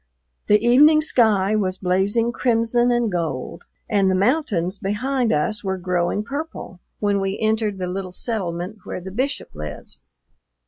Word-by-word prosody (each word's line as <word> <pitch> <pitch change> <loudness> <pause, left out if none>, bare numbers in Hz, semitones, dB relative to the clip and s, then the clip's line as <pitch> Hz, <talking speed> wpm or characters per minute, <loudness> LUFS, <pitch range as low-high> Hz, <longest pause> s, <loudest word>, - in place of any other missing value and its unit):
The 210 0 +5
evening 300 +6 +6
sky 215 -8 +3
was 190 -3 -1
blazing 200 +6 +1
crimson 240 0 +1
and 240 -3 +1
gold, 160 -8 -4 0.2
and 200 -3 +2
the 185 - +2
mountains 200 - 0
behind 240 +5 -1
us 205 +8 0
were 190 -1 -2
growing 180 +2 -1
purple 280 - -6 0.2
when 200 -1 +1
we 195 +1 -2
entered 220 -2 0
the 185 - -3
little 185 +1 -4
settlement 185 -1 -4
where - - -5
the 190 +1 -8
Bishop 260 +8 -3
lives. 75 -1 -8
205 Hz, 145 wpm, -22 LUFS, 185-235 Hz, 0.2 s, evening